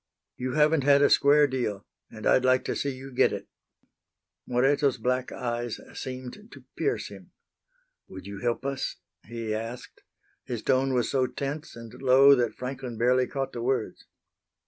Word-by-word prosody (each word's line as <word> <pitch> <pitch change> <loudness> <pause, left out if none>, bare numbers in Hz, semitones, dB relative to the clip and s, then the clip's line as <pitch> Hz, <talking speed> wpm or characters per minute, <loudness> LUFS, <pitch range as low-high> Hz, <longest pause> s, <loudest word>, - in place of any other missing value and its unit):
"You 125 0 -4
haven't 155 -1 +3
had 140 0 +5
a - - +4
square 145 +1 +5
deal, 120 -7 -3 0.2
and 110 - -10
I'd 130 - +4
like 130 0 +3
to - - -2
see 140 - -1
you 135 0 -8
get - - +3
it." - - -6 1.0
Moreto's 135 +2 +2
black 125 +2 -1
eyes 120 -1 -3
seemed 130 - -7
to - - -13
pierce - - -1
him. - - -14 0.7
"Would 95 -1 -10
you 100 0 -7
help 120 +4 -2
us?" 140 -1 -3 0.3
he 115 -1 -4
asked. 115 +3 -6 0.4
His - - -5
tone 130 0 +2
was 120 -2 0
so 130 -2 +2
tense 145 +4 -5
and 115 -1 -10
low 135 +1 +7
that 120 -5 +1
Franklin 125 -2 -6
barely 125 +2 +3
caught 135 -1 -4
the 120 - -5
words. 130 +2 -2
130 Hz, 165 wpm, -27 LUFS, 120-135 Hz, 1.0 s, low